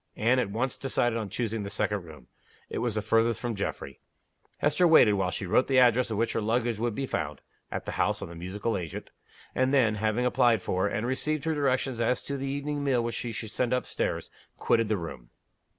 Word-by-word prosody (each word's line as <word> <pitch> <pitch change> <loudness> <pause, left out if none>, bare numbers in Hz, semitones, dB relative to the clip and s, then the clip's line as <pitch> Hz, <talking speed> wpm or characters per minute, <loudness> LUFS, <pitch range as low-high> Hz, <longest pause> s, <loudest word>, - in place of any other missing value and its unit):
Anne 120 +4 +3
at 115 - 0
once 120 +6 -2
decided 120 -3 0
on 110 -3 -3
choosing 115 +1 -2
the 100 - -5
second 105 -1 -1
room; 75 -6 -13 0.5
it - - -2
was 120 -3 -1
the 110 - -1
farthest 115 0 +2
from 120 -2 -2
Geoffrey. 70 - -4 0.6
Hester 155 +5 +3
waited 140 -10 +7
while 95 -2 +1
she 95 - -4
wrote 95 +8 +3
the 135 - +2
address 125 -1 +5
at 110 - -2
which 115 +2 0
her - - 0
luggage 115 0 0
would 115 -1 -1
be 135 - -2
found - - -3 0.3
(at - - -4
the - - -3
house - - +1
of - - -6
the 85 - -10
musical 95 +7 -3
agent), 85 -5 -6 0.4
and 130 0 +2
then, 125 -6 +4
having 110 +3 0
applied 120 -4 +3
for, 95 +2 0
and 105 +2 -2
received 145 +4 -1
her 160 - 0
directions 130 -4 0
as 125 +2 +1
to 140 - -4
the 135 0 -3
evening 145 +1 -2
meal 130 -4 +2
which 115 0 -2
she 120 - -3
should 105 0 -6
send 125 +2 +1
up 125 - -2
stairs, - - -3 0.3
quitted 115 -2 +2
the 110 - +1
room. 65 -9 -8
115 Hz, 225 wpm, -28 LUFS, 105-130 Hz, 0.6 s, waited